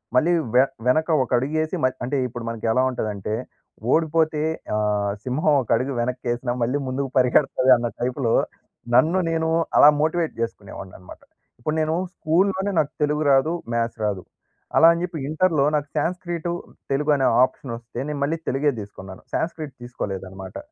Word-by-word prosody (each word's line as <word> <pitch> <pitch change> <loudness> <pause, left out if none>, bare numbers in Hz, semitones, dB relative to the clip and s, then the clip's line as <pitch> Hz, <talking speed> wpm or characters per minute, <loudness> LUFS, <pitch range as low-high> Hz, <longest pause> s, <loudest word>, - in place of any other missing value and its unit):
మళ్ళీ 155 +7 +4 0.2
వె 130 - +7 0.2
వెనక 155 +5 +3 0.2
ఒక - - -10
అడుగేసి, 155 +6 -1
మయ్ 130 0 +2
అంటే, 140 +3 -1
ఇప్పుడు 120 0 -7
మనకెలా 115 +2 0
ఉంటదంటే, 105 -4 -3 0.6
ఓడిపోతే 160 -1 +2 0.3
ఆహ్, 105 -1 0
సింహం 150 +4 +1
ఒక 120 - -10
అడుగు 135 +2 -2
వెనక్కేసినా, 120 0 -2
మళ్ళీ 125 +5 0
ముందుకు 135 +1 -2
పరిగెడతది 130 +1 +3
అన్న 120 0 -2
టైపులో, 125 -1 0 0.6
నన్ను 160 +9 +4
నేను 160 0 0 0.3
అలా 145 - +9
మోటివేట్ 160 +1 0
జేసుకునేవాడిననమాట. 95 -5 -7 0.4
ఇప్పుడు 155 +6 -2
నేను 155 0 0 0.2
స్కూల్‍లోనే 190 +4 +1
నాకు 145 - 0
తెలుగు 150 +1 0
రాదు, 135 +4 +4 0.2
మ్యాథ్స్ 115 -1 -1
రాదు. 100 -3 -1 0.6
అలా 165 - +8
అని 170 - -3
జెప్పి 175 -3 -4
ఇంటర్‍లో 155 -2 +2
నాకు 145 -1 -1
శాన్స్క్రీటు, 175 +1 -2 0.4
తెలుగు 150 +2 +1
అనే 135 -2 +2 0.2
ఆప్షన్ 130 -1 -2
వస్తే 120 +1 -9
నేను 150 -1 -4
మళ్ళీ 160 +3 0
తెలుగే 145 +2 +1
దీసుకున్నాను. 95 -2 -10
శాన్స్క్రీట్ 155 -4 -3
తీసుకోలేదనమాట. 95 -5 -6
135 Hz, 145 wpm, -23 LUFS, 115-155 Hz, 0.6 s, అలా